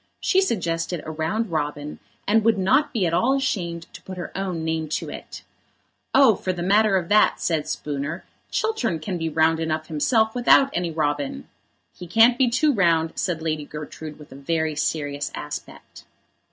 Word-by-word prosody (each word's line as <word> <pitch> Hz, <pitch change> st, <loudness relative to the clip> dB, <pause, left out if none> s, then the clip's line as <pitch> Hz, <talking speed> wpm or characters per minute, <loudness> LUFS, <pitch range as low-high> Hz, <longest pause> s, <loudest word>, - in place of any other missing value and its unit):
She 380 Hz, -, +3 dB
suggested 170 Hz, -, -1 dB
a 160 Hz, -, -5 dB
round 170 Hz, +7 st, -2 dB
robin 150 Hz, -1 st, -3 dB, 0.3 s
and 220 Hz, +2 st, +3 dB
would 225 Hz, -1 st, +3 dB
not 260 Hz, +11 st, +2 dB
be 220 Hz, -8 st, 0 dB
at 165 Hz, -, 0 dB
all 240 Hz, +10 st, +3 dB
ashamed 175 Hz, -11 st, -2 dB
to -, -, -11 dB
put 185 Hz, -1 st, -9 dB
her 175 Hz, -, -7 dB
own 185 Hz, -4 st, -3 dB
name 160 Hz, -1 st, -2 dB
to -, -, -3 dB
it. -, -, -9 dB, 0.7 s
"Oh, 270 Hz, -4 st, +7 dB
for 185 Hz, -1 st, -3 dB
the 175 Hz, -1 st, -4 dB
matter 205 Hz, +1 st, +4 dB
of 175 Hz, -2 st, -2 dB
that," 210 Hz, +1 st, +4 dB
said 155 Hz, -3 st, -1 dB
Spooner, 150 Hz, +2 st, -4 dB, 0.3 s
"Chiltern 265 Hz, -, -1 dB
can 175 Hz, +3 st, -4 dB
be 165 Hz, 0 st, -1 dB
round 160 Hz, +1 st, +2 dB
enough 155 Hz, -1 st, -2 dB
himself 220 Hz, -, +2 dB
without 270 Hz, +3 st, +5 dB
any 175 Hz, -1 st, -1 dB
robin." 145 Hz, -, -2 dB, 0.5 s
"He 180 Hz, -, -10 dB
can't 230 Hz, +6 st, +5 dB
be 260 Hz, -2 st, +4 dB
too 285 Hz, +5 st, +2 dB
round," 165 Hz, -6 st, +2 dB
said 165 Hz, -3 st, -2 dB
Lady 155 Hz, -2 st, -1 dB
Gertrude, 150 Hz, +1 st, -8 dB
with 150 Hz, -, -14 dB
a -, -, -10 dB
very 160 Hz, +2 st, -1 dB
serious 145 Hz, -1 st, -2 dB
aspect. -, -, -8 dB
170 Hz, 180 wpm, -23 LUFS, 155-215 Hz, 0.7 s, Oh